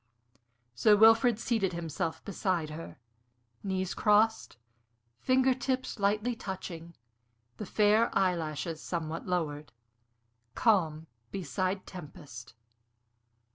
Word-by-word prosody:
Sir 210 - +5
Wilfrid 225 +1 +6
seated 220 -5 0
himself 165 -1 -4
beside 185 -6 -1
her, 165 +2 -8 0.6
knees 190 -1 -2
crossed, 220 - +2 0.6
finger 260 0 +3
tips 260 -2 -3
lightly 210 +4 +1
touching, 175 -5 -7 0.6
the 210 - -6
fair 215 +3 +3
eyelashes 165 -3 -1
somewhat 165 -1 -4
lowered 150 -6 -2 0.8
Calm 160 -8 +2 0.2
beside 185 +2 -3
Tempest. 145 - -11
185 Hz, 90 wpm, -30 LUFS, 160-215 Hz, 0.8 s, Wilfrid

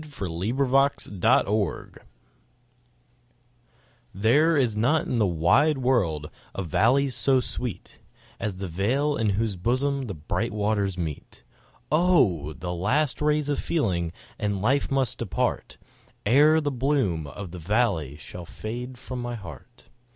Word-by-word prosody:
The 145 -11 -6
Meeting 95 +10 -3
of 135 -1 +2
the - - +5
Waters 105 -5 -2 2.2
THERE 145 - +3
is 120 -6 +1
not 140 +9 +2
in 120 - -1
the 105 - +3
wide 115 - +3
world 100 - 0 0.2
a 95 - -2
valley 130 - +2
so 130 +1 +2
sweet 125 -3 -5 0.4
As 105 -3 -3
that 95 0 -4
vale 130 - 0
in 115 -5 +1
whose 110 -2 0
bosom 130 +7 0
the 100 - -5
bright 105 +9 -2
waters 100 -3 0
meet; 80 -7 -6 0.5
Oh! 140 - +3
the 90 +5 -5
last 125 - 0
rays 150 -1 +1
of 145 -1 -1
feeling 90 - 0 0.3
and 105 -3 -1
life 130 +8 +1
must 135 -4 0
depart, 115 -6 -2 0.5
Ere 150 +8 +5
the 145 -2 -1
bloom 125 - 0
of 95 +4 -8
that 90 - -8
valley 85 - 0
shall 85 +3 -9
fade 120 +6 -6
from 125 -1 -6
my 120 0 -4
heart. 85 - -11
115 Hz, 140 wpm, -25 LUFS, 95-135 Hz, 2.2 s, the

